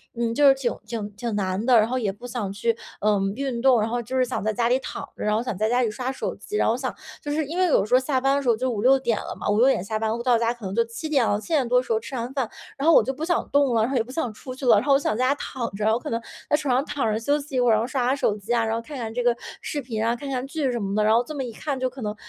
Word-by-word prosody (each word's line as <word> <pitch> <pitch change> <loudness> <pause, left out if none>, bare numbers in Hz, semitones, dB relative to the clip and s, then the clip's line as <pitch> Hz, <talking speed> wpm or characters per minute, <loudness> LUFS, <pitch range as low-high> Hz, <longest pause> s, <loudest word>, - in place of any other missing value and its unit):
嗯 230 -1 -1
就 290 +3 +5
是 270 - +8
挺 265 -3 -2
挺 215 -3 -4
挺 230 0 -3
难 190 0 -1
的， 250 -3 +6
然 215 0 +4
后 255 - -1
也 215 -6 0
不 220 +5 -12
想 230 -5 -3
去， 230 +3 0 0.3
呃， 210 -1 +3 0.2
运 260 -3 -3
动， 260 -3 +5
然 220 - 0
后 245 +1 -1
就 250 +3 -6
是 255 - +4
想 235 - -3
在 215 0 0
家 235 0 +1
里 255 - +4
躺 - - -6
着， - - -5
然 210 0 +1
后 220 - +1
想 230 - -3
在 215 +2 +1
家 245 +2 +2
里 230 - +1
刷 255 +4 -3
手 - - -4
机。 420 - -8
然 - - +2
后 225 - +3
想 255 -1 -3 0.3
就 290 - -4
是 305 0 0
因 325 +5 -5
为 370 - +4
有 285 - +3
时 235 - -4
候 255 - +7
下 260 0 0
班 270 +1 +3
的 - - 0
时 - - -5
候 230 - +5
就 255 +3 -1
5:00-6:00 240 0 +2
了 - - -6
嘛， - - -2
5:00-6:00 225 -1 +3
下 215 +2 -2
班 220 -1 0
到 245 -2 +4
家 230 +1 +1
可 235 -4 -11
能 190 - -4
就 235 - +4
7:00 255 +3 0
了， 205 0 +1
7:00 280 -1 0
多 250 +1 +4
的 250 - -2
时 - - -6
候 220 - +2
吃 265 - -8
完 240 +2 -3
饭， 265 -5 -1 0.3
然 285 +4 -1
后 330 - +7
我 - - +7
就 265 - -1
不 300 - -6
想 350 0 0
动 280 -3 +3
了， 225 - +3
然 235 - 0
后 270 - +1
也 230 - +2
不 245 - -11
想 260 -6 -2
出 255 +4 -8
去 265 - -6
了， 230 - +7
然 205 - +1
后 280 - +4
我 275 - +5
想 215 - -1
在 255 - +2
家 280 - +2
躺 245 -4 -4
着， 215 +2 +1
我 230 - +1
可 - - -6
能 230 0 -2 0.3
在 - - +4
床 290 -4 0
上 260 +3 +2
躺 245 -9 -1
着 215 - 0
休 285 +6 +1
息 280 -2 -8
一 - - +2
会 245 - +3
儿， - - +6
然 215 - +3
后 - - -1
刷 260 -2 -1
下 265 - +2
手 215 -7 +1
机 210 +4 -3
啊， 235 -1 +2
然 220 - -1
后 230 - -2
看 290 +4 -8
看 225 -3 -4
这 245 - -1
个 240 -1 +3 0.3
视 290 - -3
频 225 -3 -3
啊， 230 +1 +1
看 275 +3 -7
看 260 -1 -2
剧 280 -3 -1
什 240 - -2
么 200 0 -2
的， 215 - +2
然 215 +1 +4
后 235 +2 +4
这 305 +5 -8
么 270 - -2
一 245 - -5
看 280 +3 -4
就 255 0 0
可 260 +1 -11
能 210 -1 -3
245 Hz, 370 characters per minute, -24 LUFS, 220-270 Hz, 0.3 s, 是